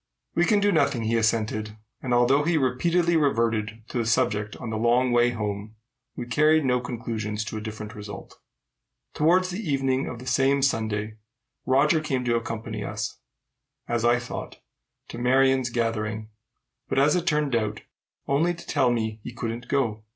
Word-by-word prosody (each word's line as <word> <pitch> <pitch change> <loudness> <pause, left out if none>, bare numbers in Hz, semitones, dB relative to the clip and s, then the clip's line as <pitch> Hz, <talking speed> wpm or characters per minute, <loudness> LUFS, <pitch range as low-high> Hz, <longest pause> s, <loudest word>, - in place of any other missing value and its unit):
"We 175 - +3
can 210 +1 +3
do 205 0 +3
nothing," 140 - +2
he 110 +1 0
assented; 110 -1 0 0.2
and, 130 - -4
although 120 +4 +4
we 165 +2 +1
repeatedly 170 +6 +2
reverted 115 -7 0
to 125 - -2
the 115 - 0
subject 105 -2 +1
on 110 - -6
the - - -2
long 120 +3 +2
way 120 0 +4
home, 105 -2 -4 0.4
we 120 - -5
carried 155 +4 +3
no 125 -1 +2
conclusions 110 -3 -4
to 110 - -5
a - - -5
different 110 0 -7
result. 105 -1 -9 0.7
Towards 180 +4 +2
evening 135 -9 0
of 125 - -5
the 125 - -10
same 135 +2 +2
Sunday, 110 -4 -1 0.5
Roger 150 +4 +3
came 130 -5 -2
to 120 -1 +2
accompany 115 -1 -4
us, - - -4 0.7
as 120 -1 -1
I 120 +1 +4
thought, 120 - -6 0.5
to 115 - -7
Marion's 130 +1 +3
gathering, 110 -2 -2 0.6
but, - - -1
as 145 +4 +4
it 180 0 -1
turned 150 -5 +1
out, 110 -2 -1 0.4
only 165 +6 +1
to 170 - -12
tell 125 - +2
me 110 -2 -2
he - - -6
couldn't 115 0 -5
go. 115 -6 0
120 Hz, 165 wpm, -25 LUFS, 110-140 Hz, 0.7 s, although